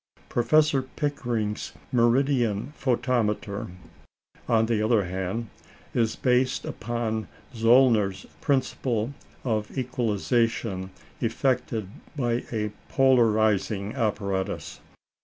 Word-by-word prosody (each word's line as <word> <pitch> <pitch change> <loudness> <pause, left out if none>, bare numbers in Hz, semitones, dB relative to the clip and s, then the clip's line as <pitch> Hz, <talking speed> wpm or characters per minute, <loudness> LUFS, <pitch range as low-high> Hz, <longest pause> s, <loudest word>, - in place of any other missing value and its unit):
Professor 150 +3 +3
Pickering's 125 -6 -3 0.2
"meridian 120 -1 +2
photometer," 115 -6 0 0.8
on 115 -2 +4
the 110 -2 +1
other 110 -2 +3
hand, 95 +5 -3 0.4
is 115 -2 +1
based 130 0 +1
upon 115 -1 -3 0.3
Zöllner's 115 -4 +4 0.2
principle 130 -4 0 0.3
of 110 -1 -2
equalization 115 -5 0 0.3
effected 115 -3 0 0.3
by 120 -3 0
a 105 -2 -1 0.2
polarising 110 -5 +3
apparatus. 100 -6 -2
115 Hz, 80 wpm, -26 LUFS, 105-125 Hz, 0.8 s, on